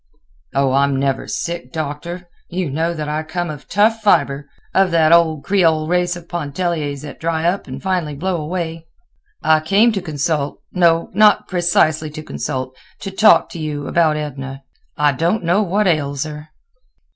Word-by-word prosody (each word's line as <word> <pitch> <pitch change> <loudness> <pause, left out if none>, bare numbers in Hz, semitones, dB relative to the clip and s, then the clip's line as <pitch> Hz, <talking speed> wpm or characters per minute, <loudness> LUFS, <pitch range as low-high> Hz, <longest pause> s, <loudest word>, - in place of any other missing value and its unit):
"Oh! 135 -1 +2
I'm 140 +1 +2
never 135 -1 -1
sick, 170 0 -4
Doctor. 165 +3 -5 0.2
You 175 -4 -2
know 165 +4 0
that 155 -2 -4
I 150 +1 -1
come 175 +1 -3
of 150 -1 -11
tough 220 +3 +2
fiber—of 150 +1 +1
that 165 -2 +3
old 160 -3 +3
Creole 165 -6 +2
race 175 0 +1
of 175 -1 -11
Pontelliers 155 -3 -3
that 145 - -9
dry 165 0 -1
up 185 +3 -1
and - - -8
finally 180 -6 -1
blow 175 +2 -2
away. 165 0 -4 0.6
I 155 0 +4
came 200 +9 +3
to 200 -3 -2
consult—no, 165 +2 0
not 210 +1 +4
precisely 160 -4 +1
to 155 +1 -8
consult—to 130 +6 -6
talk 210 +3 +5
to 170 - -8
you 150 -2 -4
about 160 -1 +2
Edna. 135 -2 -6 0.3
I 150 0 +3
don't 170 +10 0
know 175 +5 +2
what 205 +2 +1
ails 145 -5 0
her." 150 0 -8
160 Hz, 155 wpm, -19 LUFS, 150-175 Hz, 0.6 s, talk